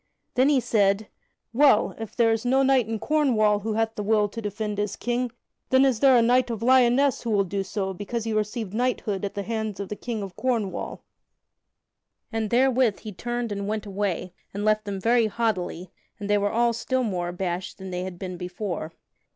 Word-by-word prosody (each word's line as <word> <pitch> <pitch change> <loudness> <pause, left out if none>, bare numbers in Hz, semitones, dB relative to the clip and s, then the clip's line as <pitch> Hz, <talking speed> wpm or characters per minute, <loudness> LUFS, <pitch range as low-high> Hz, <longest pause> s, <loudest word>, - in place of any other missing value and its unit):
Then 260 +2 +4
he 285 -3 +4
said: 205 -3 +1 0.4
"Well, 265 -3 +4
if 225 -2 -7
there 230 -2 +4
is 225 0 0
no 265 +2 +3
knight 265 -4 +3
in 225 0 -2
Cornwall 225 -7 +2
who 220 +2 -3
hath 225 +1 0
the 210 - -4
will 210 0 +2
to 230 - -6
defend 210 0 -3
his 205 -1 -1
King, 245 +1 -1 0.4
then 260 +1 +5
is 255 -5 +2
there 270 -2 +6
a 235 - +5
knight 250 +2 +3
of 230 -1 -4
Lyonesse 260 +2 +4
who 235 - -4
will 205 -2 +3
do 195 +1 -2
so 195 0 -3
because 210 +4 -4
he 225 -1 -2
received 215 -1 -2
knighthood 220 -4 -1
at 200 +1 -3
the 200 - -2
hands 220 -2 -3
of 200 - -5
the 210 - -3
King 225 -1 -4
of 190 -2 -8
Cornwall." 230 -7 -2 1.3
And 225 -2 -1
therewith 250 -2 +3
he 215 - -7
turned 240 +3 -3
and 200 0 -3
went 215 0 -2
away, 195 -3 -2 0.2
and 205 +1 -2
left 215 0 +2
them 200 -1 -4
very 230 +2 +3
haughtily, 190 -5 -2 0.3
and 205 - -5
they 205 0 +3
were 205 0 +1
all 235 +1 +2
still 255 +3 -1
more 180 -6 -2
abashed 175 0 -4
than 190 -1 -8
they 180 0 -3
had 185 -1 -6
been 180 -1 -6
before. 180 -2 -5
215 Hz, 205 wpm, -25 LUFS, 200-240 Hz, 1.3 s, there